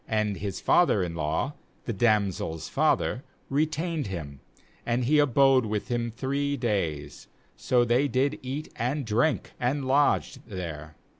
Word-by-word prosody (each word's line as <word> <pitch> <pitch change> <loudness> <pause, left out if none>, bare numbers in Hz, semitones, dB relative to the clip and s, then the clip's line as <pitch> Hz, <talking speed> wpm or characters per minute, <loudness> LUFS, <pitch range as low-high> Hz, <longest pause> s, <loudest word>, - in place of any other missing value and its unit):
4And 105 -2 0
his 95 +1 -4
father 170 - +3
in 85 -2 -3
law, 80 - -1 0.3
the 115 - -2
damsel's 100 -7 0
father, - - +1 0.3
retained 155 - 0
him; 75 -7 -6 0.4
and 120 +1 0
he 150 +4 +4
abode 135 -3 +4
with 105 -1 -3
him 120 -1 -1
three 140 +4 -2
days; 80 - -2 0.3
so 120 -1 +2
they 120 +5 +2
did 140 +2 0
eat 135 +4 -5
and 130 +4 -1
drink, 120 +7 +1
and 135 +3 0
lodged 140 0 +2
there. 80 -7 -6
120 Hz, 140 wpm, -27 LUFS, 95-140 Hz, 0.4 s, he